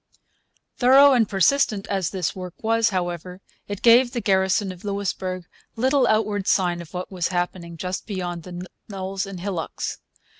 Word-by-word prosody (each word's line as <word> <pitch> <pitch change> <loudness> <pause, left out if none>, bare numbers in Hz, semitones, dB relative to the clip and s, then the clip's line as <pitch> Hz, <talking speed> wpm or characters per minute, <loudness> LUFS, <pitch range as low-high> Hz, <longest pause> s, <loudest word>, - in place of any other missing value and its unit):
Thorough 270 +3 +7
and 230 -5 +3
persistent 205 - +2
as 190 -4 -1
this 185 -5 -2
work 180 -2 -7
was, 225 0 +3
however, 180 -1 -3 0.3
it 205 -1 -6
gave 240 +2 +7
the 245 - -1
garrison 190 -1 +2
of 180 -1 -12
Louisbourg 190 -3 -3 0.3
little 260 +2 +2
outward 210 -3 +1
sign 175 -2 +2
of 170 +2 -12
what 180 +2 -5
was 180 -3 -1
happening 175 -1 -3
just 180 +3 -4
beyond 180 -4 -4
the 180 +1 -8 0.2
knolls 195 0 -4
and 195 -2 -7
hillocks. 180 -3 -4
190 Hz, 155 wpm, -23 LUFS, 180-215 Hz, 0.3 s, Thorough